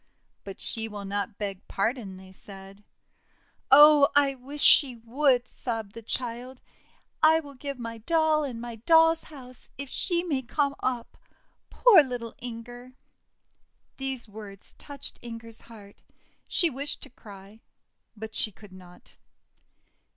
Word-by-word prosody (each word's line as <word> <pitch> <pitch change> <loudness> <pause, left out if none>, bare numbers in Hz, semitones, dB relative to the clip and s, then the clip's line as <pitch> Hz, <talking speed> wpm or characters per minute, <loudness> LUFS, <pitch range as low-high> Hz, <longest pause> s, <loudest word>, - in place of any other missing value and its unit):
'But 195 -1 -9
she 225 -1 -1
will 205 -2 -7
not 200 +1 -3
beg 195 -3 -5
pardon," 200 -2 -2
they 190 0 -14
said. 195 +1 -13 0.9
"Oh! 295 +1 +8
I 285 -1 +4
wish 275 +3 -5
she 265 -4 +6
would!' 250 +2 +1
sobbed 225 -6 -5
the 230 - -9
child. 245 +2 -5 0.6
'I 320 +1 +5
will 285 -2 -12
give 280 +1 -6
my 230 -2 -7
doll 315 +4 +2
and 250 -5 -5
my 235 -1 -7
doll's 325 +6 +4
house, 255 -4 -13
if 280 0 -7
she 345 -2 0
may 295 -7 -1
come 280 +3 -1
up! 245 -2 -3 0.5
Poor 465 -9 +7
little 245 -4 -5
Inger!' 245 +1 -9 1.0
These 265 -3 -4
words 205 -2 -10
touched 285 -1 -8
Inger's 230 -1 -10
heart; 205 -3 -15 0.5
she 340 -4 +1
wished 280 +3 -4
to - - -12
cry, 205 -1 -14 0.6
but 220 +1 -8
she 215 - +2
could 205 0 -16
not. 180 -1 -16
240 Hz, 135 wpm, -27 LUFS, 215-280 Hz, 1.0 s, Oh